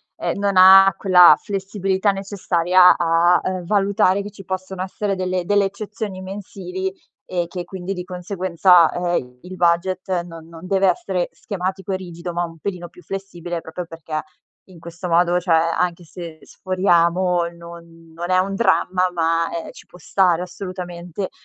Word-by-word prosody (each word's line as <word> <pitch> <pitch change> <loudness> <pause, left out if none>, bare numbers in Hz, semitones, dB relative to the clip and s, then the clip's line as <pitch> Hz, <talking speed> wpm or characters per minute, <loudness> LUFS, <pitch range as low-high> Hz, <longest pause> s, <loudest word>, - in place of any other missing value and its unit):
ehm, - - -3
non 200 0 0
ha 190 0 +8
quella 180 -3 +7
flessibilità 195 0 -1
necessaria 185 -2 +3
a, 170 +1 +3
uhm, 185 -1 -3
valutare 200 0 +2
che 205 +1 -8
ci 195 -2 -13
possono 185 0 -4
essere 195 +1 -3
delle 185 -1 -2
delle 205 +2 +2
eccezioni 200 0 -6
mensili 190 -1 -6 0.3
e 175 -2 -2
che 180 -1 -6
quindi 185 +1 -7
di 180 -2 -6
conseguenza, 180 -2 +3
uhm, 175 -9 -3
il 185 +1 -9
budget 180 +1 0
non 165 -2 -11
non 165 +1 -12
deve 195 +1 +2
essere 180 0 -3
schematico 190 +1 -5
e 190 - 0
rigido, 175 -1 -7
ma 175 0 -1
un 165 -1 -11
pelino 175 0 -5
più 180 - -18
flessibile 175 -2 -6
proprio 165 +2 -7
perché 160 -1 -6 0.4
in 185 -2 -16
questo 170 +2 -8
modo 175 +1 +3
cioè 175 -2 +2 0.2
anche 175 -1 -1
se 165 -1 -9
sforiamo 180 -1 +1
non 170 -1 -13
non 175 +2 -6
è 185 - +3
un 195 +2 0
dramma 185 -3 +1
ma, 165 -1 0
ehm, 170 -1 -5
ci - - -16
può 180 - -16
stare 180 0 +1
assolutamente 180 0 -6
180 Hz, 160 wpm, -20 LUFS, 170-190 Hz, 0.4 s, ha